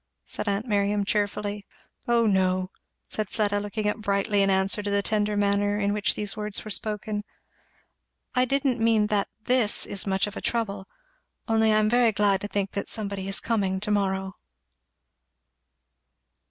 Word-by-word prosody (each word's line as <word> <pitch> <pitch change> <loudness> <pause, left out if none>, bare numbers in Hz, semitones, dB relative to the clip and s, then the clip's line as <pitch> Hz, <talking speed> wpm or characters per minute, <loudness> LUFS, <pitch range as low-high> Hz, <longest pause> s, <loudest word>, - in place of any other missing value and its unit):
said - - -4
aunt 200 +3 -1
Miriam 205 -2 +1
cheerfully. 205 0 -1 0.4
"O 235 -1 +3
no!" 185 -2 +1 0.4
said 215 -3 -3
Fleda, 205 -2 0
looking 205 +1 -3
up 210 - 0
brightly 200 -1 +1
in 195 - +3
answer 190 +2 +2
to 205 - -3
the 200 0 +1
tender 210 -1 +1
manner 205 0 +2
in 205 -1 +1
which 210 -1 0
these 205 0 -1
words 210 -1 -2
were 215 - -6
spoken; 210 0 -2
"and 205 - -4 1.1
I 250 0 +3
didn't 270 -1 +1
mean 225 -2 +4
that 200 -1 +2 0.2
this 245 -3 +2
is 200 0 -3
much 190 0 +1
of 205 0 -7
a - - -5
trouble 200 -5 -2 0.6
only 220 -1 +3
I 215 - +4
am 215 0 +3
very 240 0 +4
glad 200 -2 +2
to 205 - -3
think 200 -1 -2
that 200 - -3
somebody 200 -3 -4
is 195 - 0
coming 195 -5 0
to 210 +2 -2
morrow." 190 -1 -1
205 Hz, 170 wpm, -26 LUFS, 200-215 Hz, 1.1 s, mean